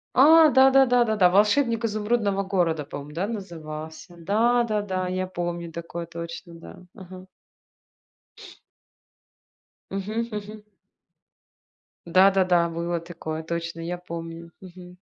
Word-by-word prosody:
А 315 +4 +7
да 265 -1 +6
да 270 0 +6
да 245 -1 +3
да 220 -1 0
да, 180 -2 +5
"Волшебник 230 +4 +2
изумрудного 210 -2 0
города", 175 -6 0
по-моему, 145 +1 -9
да, 185 +5 -2
назывался. 160 -4 -8
Да-да-да, 210 -1 0
я 185 +1 -2
помню 175 -2 -5
такое 170 +1 -6
точно, 170 +1 -8
да, 165 - -12 0.2
ага. 185 -2 -11 2.6
Мгм 215 +4 -3
мгм. 210 0 -7 1.4
Да-да-да, 185 -1 +4
было 170 +1 -3
такое, 160 -2 -7
точно, 165 0 -5
я 175 +2 -4
помню. 170 -1 -8
Мгм. 180 -1 -13
185 Hz, 110 wpm, -24 LUFS, 170-210 Hz, 2.6 s, А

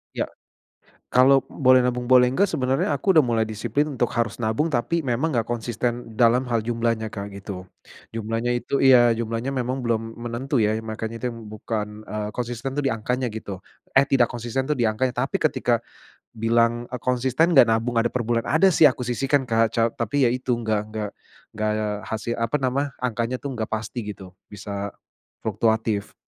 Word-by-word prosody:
Iya. - - -1 0.9
Kalau 135 +1 +5
boleh 130 -2 +4
nabung 125 0 -1
boleh 125 -1 +7
enggak, 185 +10 +1
sebenarnya 135 +5 0
aku 190 -2 +1
udah 155 - +7
mulai 115 -3 +1
disiplin 120 +7 -1
untuk 120 -1 0
harus 115 -3 0
nabung, 110 +8 +1
tapi 155 +4 0
memang 135 +2 0
enggak 115 -2 +1
konsisten 120 0 -3
dalam 120 +1 +5
hal 115 - +2
jumlahnya, 115 0 -1
Kak, 100 -1 -6
gitu. 95 -2 -7 0.4
Jumlahnya 115 +2 -2
itu 120 +3 -1
iya, 120 -3 +6
jumlahnya 115 +3 -3
memang 130 +1 -1
belum 115 -1 -2
menentu 120 +3 -2
ya. 110 0 +2
Iya 110 - -3
makanya 110 +1 -5
itu 125 - -1
yang 115 0 -9
bukan, 105 0 -5
eee, 105 0 -4
konsisten 120 +2 -4
tuh 145 - -1
di 135 - +1
angkanya 125 +2 -2
gitu, 100 -3 -7 0.3
eh, 135 - +7
tidak 125 -3 +4
konsisten 120 +2 -3
tuh 150 - +1
di 120 -4 +1
angkanya, 125 +3 -1
tapi - - -1
ketika - - +1 0.5
bilang, 115 +1 +1
eee, 125 -1 -6
"Konsisten 130 +6 +2
enggak 135 -7 +7
nabung 115 +1 +1
ada 115 - +2
per 120 0 -2
bulan?" 115 0 -1
Ada 185 +5 +4
sih 155 -2 +7
aku 125 -1 -1
sisihkan, 135 +3 +1
Kak, 115 -2 +2
ca 115 - +3
tapi 120 +4 -1
ya - - +1
itu 125 -1 -1
enggak 110 -2 -1
enggak 105 -1 -4 0.5
enggak 105 0 -1 0.2
hasil, 110 +1 -3
apa 115 +5 0
nama, 135 +1 -1
angkanya 120 0 -1
tuh 140 +2 -5
enggak 110 -3 -3
pasti 110 +2 -3 0.2
gitu, 95 -2 -12 0.2
bisa 100 0 -6 0.5
fluktuatif. 110 -2 0
120 Hz, 185 wpm, -24 LUFS, 110-130 Hz, 0.9 s, boleh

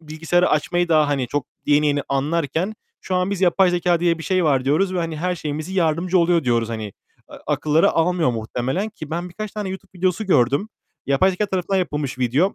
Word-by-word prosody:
bilgisayarı 165 +3 0
açmayı 175 +3 +1
daha, 155 -2 +4
hani, 135 -3 0
çok 145 -2 -2 0.2
yeni 150 +1 +3
yeni 145 -1 +1
anlarken, 160 +7 -1 0.3
şu 185 - -4
an 180 +1 +1
biz 200 -2 -3
yapay 185 0 +4
zekâ 175 -1 +1
diye 170 -1 +2
bir - - -7
şey 185 0 +1
var 135 -4 +2
diyoruz 185 +7 +1
ve 180 - 0
hani 165 -2 -2
her 180 +3 -1
şeyimizi 155 +2 -5
yardımcı 175 +1 +1
oluyor 170 -2 +2
diyoruz 115 -2 +1
hani. 110 -2 -4 0.5
Eee, - - -10
akılları 155 +2 +2
almıyor 165 -3 +2
muhtemelen 125 - -2
ki 160 -8 -10
ben 175 +2 -3
birkaç 215 +4 -6
tane 210 -2 -4
YouTube 190 -1 -9
videosu 185 +3 0
gördüm. 140 - +2 0.4
Yapay 140 +8 +3
zekâ 200 +3 -1
tarafından 190 0 -1
yapılmış 150 -7 -3
video, 135 - +1
165 Hz, 200 wpm, -21 LUFS, 145-185 Hz, 0.5 s, daha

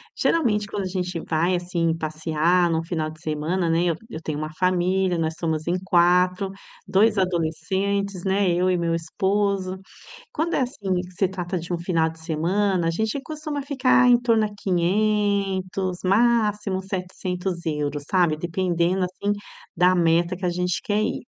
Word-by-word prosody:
Geralmente 210 -10 +1
quando 200 - -3
a - - -2
gente 180 -2 -3
vai, 170 +3 +1
assim, 175 -2 0
passear 160 +3 +1
num 165 0 0
final 165 -2 -2
de 155 0 -13
semana, 160 +3 -1
né, 165 +1 +2
eu 170 -2 +1
eu 165 -8 -7
tenho 155 -2 -4
uma 155 +1 -4
família, 185 0 +2
nós 160 0 -1
somos 160 -2 -1
em 180 +1 +1
4. 180 +2 +3 0.4
2 210 +2 +3
adolescentes, 190 +3 -1
né, 190 0 +2
eu 180 +2 +2
e 180 - +2
meu 170 -1 0
esposo. 190 +3 -1 0.5
Quando 330 +3 -1
é - - +2
assim, 205 -7 -3
que 180 - -11
se 185 +1 +1
trata 180 -1 -3
de 170 +2 -9
um 175 - -1
final 165 -2 +1
de 160 0 -10
semana, 175 +3 0
a - - +2
gente 220 +9 -1
costuma 305 -1 -5
ficar 260 -2 +3
em 245 -1 +6
torno 230 -3 +2
a - - -4
500, 195 -1 0
máximo 210 -1 +2
€700, 180 -6 -3
sabe. 175 -5 +3
Dependendo, 175 +1 0
assim, 185 +3 -2 0.4
da 180 +2 +4
meta 170 +1 +2
que 185 - -2
a - - +1
gente 180 0 -1
quer 215 -4 0
ir. - - -1
180 Hz, 165 wpm, -24 LUFS, 170-200 Hz, 0.5 s, em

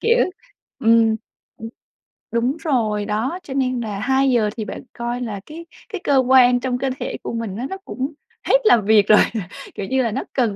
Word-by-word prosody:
kiểu 465 +1 +3 0.6
ừm, 225 -2 +4 0.4
ừm, 225 - -7 0.6
đúng 240 +5 0
rồi, 225 -10 0
đó, 235 - -2
cho 270 - -7
nên 255 -2 0
là 210 -3 -4
2:00 255 -2 +2
thì 220 - -3
bạn - - -7
coi 240 +1 -4
là 215 -5 -4
cái 330 +2 -10 0.2
cái 400 -5 -5
cơ 280 - +3
quan 250 -1 +5
trong 250 -1 -2
cơ 270 +2 -1
thể - - -4
của - - -4
mình 230 -4 -4
á, 245 - -3
nó 385 - -5
cũng 270 +4 -4 0.3
hết - - +6
làm 230 - +5
việc 210 -1 +5
rồi, 215 - +7 0.6
kiểu 195 - -4
như 260 +5 +1
là, 230 - -1
nó 255 - -2
cần 235 -6 +1
245 Hz, 200 wpm, -21 LUFS, 220-265 Hz, 0.6 s, rồi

